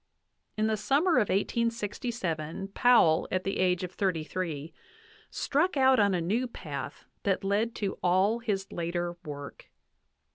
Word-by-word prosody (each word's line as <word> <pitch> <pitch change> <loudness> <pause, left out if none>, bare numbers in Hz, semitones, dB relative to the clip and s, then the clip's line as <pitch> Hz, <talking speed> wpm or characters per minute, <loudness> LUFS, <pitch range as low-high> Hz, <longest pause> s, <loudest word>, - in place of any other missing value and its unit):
In 215 - +2
the 220 0 +1
summer 295 - +2
of 215 -5 +2
1867 205 - -2
Powell, 200 -8 +4
at 185 0 0
the 195 - -2
age 180 -1 +2
of 180 - -4
thirty 185 -5 -1
three, 160 -3 -4 0.6
struck 360 -4 0
out 265 -1 +5
on 200 -2 +3
a - - 0
new 220 +10 0
path 145 -10 -7 0.2
that 195 -1 0
led 210 +4 0
to 200 -2 -3
all 190 +6 +3
his 200 -4 -2
later 175 0 -2
work. 145 -3 -8
195 Hz, 145 wpm, -29 LUFS, 175-230 Hz, 0.6 s, out